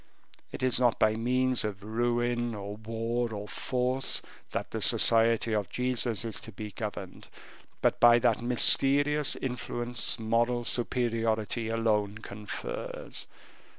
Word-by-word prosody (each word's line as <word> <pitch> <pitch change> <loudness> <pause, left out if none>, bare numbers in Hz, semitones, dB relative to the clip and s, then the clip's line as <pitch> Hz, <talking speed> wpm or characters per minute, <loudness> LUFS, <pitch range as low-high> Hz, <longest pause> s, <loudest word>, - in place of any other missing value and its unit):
It - - -6
is 125 -2 +4
not 120 -2 +3
by 110 0 +3
means 125 +2 +2
of 100 -2 -5
ruin, 120 +1 -1
or 100 0 -6
war, 115 +2 -3
or 105 -1 -6
force, 130 +3 -1 0.3
that - - -4
the - - -4
Society 115 0 +3
of 105 -4 -1
Jesus 125 -3 0
is 115 - -4
to 110 - -9
be 105 +1 -7
governed, 100 -2 -7 0.6
but - - +2
by 120 0 +7
that 120 - +1
mysterious 140 +4 +4
influence 120 -2 -2
moral 120 +2 0
superiority 115 -2 -1
alone 105 -2 0
confers. 105 -1 -6
115 Hz, 125 wpm, -29 LUFS, 110-120 Hz, 0.6 s, by